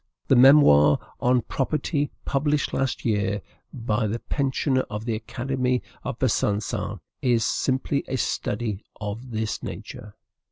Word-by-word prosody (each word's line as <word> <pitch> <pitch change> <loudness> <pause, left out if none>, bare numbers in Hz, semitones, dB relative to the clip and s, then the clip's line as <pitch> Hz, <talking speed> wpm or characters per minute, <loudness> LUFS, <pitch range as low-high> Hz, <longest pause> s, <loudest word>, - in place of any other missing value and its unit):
The - - +6
memoir 120 - +7 0.2
on 125 -1 +2
"Property," 145 +3 -1 0.2
published 145 +1 0
last 135 -2 -1
year 105 -3 0 0.3
by 115 -3 -1
the 110 +3 -2
pensioner 135 +1 0
of 105 +1 -5
the 115 - -1
Academy 125 +3 -1 0.2
of 135 -3 -4
Besancon, 105 -5 -1 0.2
is 120 -3 +2
simply 135 +1 0
a 130 - -2
study 105 -3 -2 0.2
of 110 +4 -5
this 110 -1 -3
nature. 105 -1 -8
120 Hz, 125 wpm, -25 LUFS, 105-135 Hz, 0.3 s, memoir